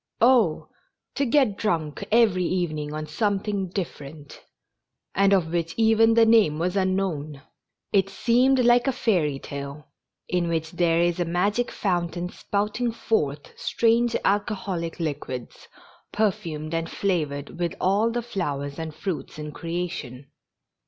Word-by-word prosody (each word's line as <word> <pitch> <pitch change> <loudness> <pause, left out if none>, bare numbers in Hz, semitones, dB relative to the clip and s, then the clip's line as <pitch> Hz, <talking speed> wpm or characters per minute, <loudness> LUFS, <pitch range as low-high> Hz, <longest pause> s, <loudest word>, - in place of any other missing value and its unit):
Oh! 235 -10 +4 0.5
to 280 - 0
get 245 -6 +3
drunk 160 -8 -1
every 215 -5 +4
evening 155 -5 -1
on 155 0 -4
something 200 +3 -1
dif 185 -1 -4
ferent, 145 0 -11 0.7
and 195 +1 +3
of 175 -4 +2
which 170 -1 -1
even 225 0 +4
the 230 -1 +6
name 220 -10 +4
was 180 +3 -1
unknown! 185 -7 -1 0.5
It 195 -1 +3
seemed 250 +5 +3
like 240 +2 +5
a 270 - +2
fairy 175 - +1
tale, 140 +1 -7 0.4
in 180 -1 0
which 160 -1 -2
there 170 -1 +2
is 175 0 +1
a 175 - +1
magic 200 +8 0
foun 175 -4 -1
tain 175 +1 -4
spouting 210 +6 -2
forth 150 -11 -1
strange 235 +1 +2
alcoholic 190 -5 -1
liquids, 140 -6 -5 0.4
perfumed 170 -8 -1
and 165 0 -1
flavored 150 -7 -2
with 170 -1 -1
all 200 +5 +2
the 240 +1 -2
flowers 145 -11 -3
and 160 -1 -5
fruits 180 -2 -5
in 150 0 -6
creation. 165 -6 -5
180 Hz, 140 wpm, -25 LUFS, 155-210 Hz, 0.7 s, the